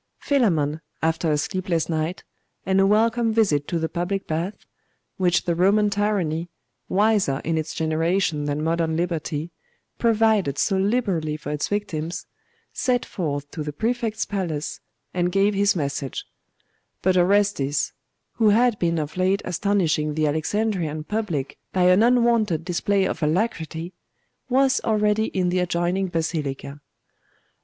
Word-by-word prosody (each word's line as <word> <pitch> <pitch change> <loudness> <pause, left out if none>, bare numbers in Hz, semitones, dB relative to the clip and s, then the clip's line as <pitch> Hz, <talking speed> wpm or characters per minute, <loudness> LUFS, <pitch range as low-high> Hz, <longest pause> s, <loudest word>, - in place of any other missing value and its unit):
Philammon, 165 - +1 0.2
after 160 0 +1
a 150 - +2
sleepless 175 0 -1
night, 160 +2 -2 0.4
and 190 0 +2
a 195 - +4
welcome 225 +2 +3
visit 190 -11 +2
to 175 - -1
the 160 0 -1
public 175 +4 -2
baths, 170 +6 -3 0.5
which 180 -2 +2
the 170 - 0
Roman 200 +4 +3
tyranny, 185 -5 0 0.4
wiser 200 -8 +2
in 165 - 0
its 155 0 -3
generation 160 0 0
than 145 +1 -1
modern 165 0 0
liberty, 165 -2 -2 0.5
provided 220 - +2
so 195 - +1
liberally 190 -7 0
for 150 -1 -6
its 150 -1 -1
victims, 175 -4 -3 0.5
set 250 -1 0
forth 145 -5 -4
to 155 - -5
the 150 0 -3
Prefect's 225 - -1
palace, 170 -7 -3 0.3
and 180 0 0
gave 195 +2 +3
his 200 0 +2
message; 140 -4 -3 0.8
but 185 0 +3
Orestes, 180 -7 +2 0.4
who 220 -2 +4
had 235 +1 +3
been 170 -1 +1
of 155 +2 -4
late 190 +2 +1
astonishing 170 -5 0
the 155 0 +1
Alexandrian 160 0 -1
public 175 -9 -3
by 185 - +2
an 180 +3 +5
unwonted 235 -8 +3
display 190 +2 +1
of 170 - -3
alacrity, 165 0 -1 0.6
was 265 +1 +3
already 210 0 +2
in 185 -4 0
the 180 +1 +1
adjoining 180 +2 0
Basilica. 150 -4 -3
180 Hz, 135 wpm, -23 LUFS, 155-205 Hz, 0.8 s, an